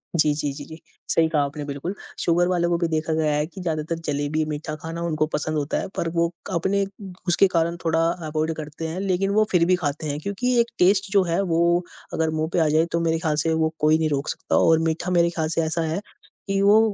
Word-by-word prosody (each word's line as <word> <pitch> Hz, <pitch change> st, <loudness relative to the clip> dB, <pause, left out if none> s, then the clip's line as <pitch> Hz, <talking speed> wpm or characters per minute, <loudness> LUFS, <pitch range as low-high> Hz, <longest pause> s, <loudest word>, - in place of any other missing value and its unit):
जी, 150 Hz, -2 st, +3 dB
जी, 145 Hz, -1 st, -2 dB
जी, 145 Hz, 0 st, -8 dB
जी। 160 Hz, 0 st, -11 dB, 0.3 s
सही 165 Hz, -1 st, +3 dB
कहा 155 Hz, -2 st, +2 dB
आपने 145 Hz, +1 st, -6 dB
बिल्कुल, 140 Hz, +6 st, -4 dB, 0.3 s
शुगर 175 Hz, +1 st, +2 dB
वाले 175 Hz, -1 st, +1 dB
को 170 Hz, 0 st, +1 dB
भी 170 Hz, -1 st, 0 dB
देखा 160 Hz, 0 st, -1 dB
गया 155 Hz, -1 st, +1 dB
है 150 Hz, -, +1 dB
कि 180 Hz, +3 st, -10 dB
ज़्यादातर 160 Hz, -1 st, -2 dB
जलेबी 145 Hz, +2 st, 0 dB
मीठा 155 Hz, 0 st, -4 dB
खाना 165 Hz, +2 st, -6 dB
उनको 155 Hz, -2 st, +1 dB
पसंद 155 Hz, +1 st, -1 dB
होता 145 Hz, -1 st, -1 dB
है -, -, -4 dB
पर 170 Hz, -, -1 dB
वो 170 Hz, 0 st, +1 dB, 0.2 s
क -, -, -4 dB
अपने 195 Hz, +3 st, +1 dB, 0.4 s
उसके 175 Hz, +3 st, +5 dB
कारण 170 Hz, -2 st, 0 dB
थोड़ा 165 Hz, 0 st, +1 dB, 0.3 s
अवॉइड 155 Hz, +1 st, -1 dB
करते 155 Hz, +1 st, -6 dB
हैं 170 Hz, +4 st, -4 dB
लेकिन 195 Hz, 0 st, 0 dB
वो 215 Hz, +2 st, +4 dB
फिर 175 Hz, -2 st, +4 dB
भी 185 Hz, +1 st, +4 dB
खाते 155 Hz, -2 st, -3 dB
हैं 145 Hz, 0 st, -2 dB
क्योंकि 240 Hz, +8 st, 0 dB
एक 235 Hz, -, +3 dB
टेस्ट 195 Hz, +2 st, +3 dB
जो 200 Hz, -2 st, +4 dB
है 170 Hz, +2 st, 0 dB
वो 170 Hz, -1 st, +2 dB, 0.3 s
अगर 160 Hz, 0 st, +1 dB
मुँह 155 Hz, 0 st, -1 dB
पे -, -, +2 dB
आ 160 Hz, -, +3 dB
जाए 155 Hz, +2 st, +3 dB
तो 170 Hz, -, +1 dB
मेरे 165 Hz, -1 st, +1 dB
ख़्याल 160 Hz, -3 st, 0 dB
से 165 Hz, -, +1 dB
वो 160 Hz, 0 st, +1 dB
कोई 155 Hz, +1 st, +4 dB
नहीं 160 Hz, -1 st, 0 dB
रोक 140 Hz, 0 st, -1 dB
सकता -, -, -2 dB
और 160 Hz, -1 st, +5 dB
मीठा 170 Hz, +3 st, -2 dB
मेरे 170 Hz, -1 st, +4 dB
ख़्याल 160 Hz, -2 st, -2 dB
से 165 Hz, 0 st, 0 dB
ऐसा 160 Hz, +1 st, -1 dB
है 160 Hz, +4 st, -1 dB, 0.5 s
कि 195 Hz, 0 st, +1 dB
वो 205 Hz, +2 st, +6 dB
165 Hz, 245 wpm, -23 LUFS, 155-175 Hz, 0.5 s, वो